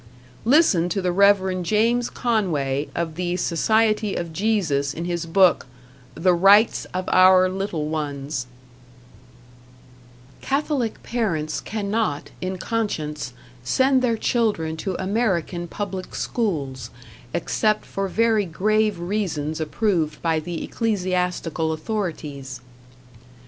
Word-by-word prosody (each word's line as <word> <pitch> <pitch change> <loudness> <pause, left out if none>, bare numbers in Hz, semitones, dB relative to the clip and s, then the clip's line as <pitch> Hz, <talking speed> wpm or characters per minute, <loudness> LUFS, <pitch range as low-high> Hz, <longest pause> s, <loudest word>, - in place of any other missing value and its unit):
Listen 230 - +4
to 190 - -1
the 180 -1 0
Rev. 190 -1 +3
James 230 +6 +1
Conway, 155 - -1
of 170 -2 -2
the 175 +1 -2
Society 215 +4 +1
of 170 -2 -4
Jesus, 160 -9 0
in 170 - -4
his 170 -1 -3
book, 185 -5 +4 0.5
"The 180 +1 +3
Rights 200 +5 +5
of 185 0 -5
Our 185 0 +6
Little 185 -5 -3
Ones": 145 -4 -3 1.9
Catholic 275 -4 -1
parents 165 -11 -1
cannot, 210 -7 -2
in 185 +1 -3
conscience, 155 - -3 0.3
send 260 - +3
their 235 -3 +1
children 210 -11 0
to 190 +2 -3
American 190 -4 -1
public 190 0 -5
schools, 140 - -2 0.4
except 215 - 0
for 195 0 -3
very 220 +1 +2
grave 210 +4 +1
reasons 170 -5 -2
approved 160 -2 0
by 165 -2 +2
the 170 +1 -5
ecclesiastical 180 -6 -1
authorities. 155 - -4
185 Hz, 105 wpm, -23 LUFS, 160-215 Hz, 1.9 s, Our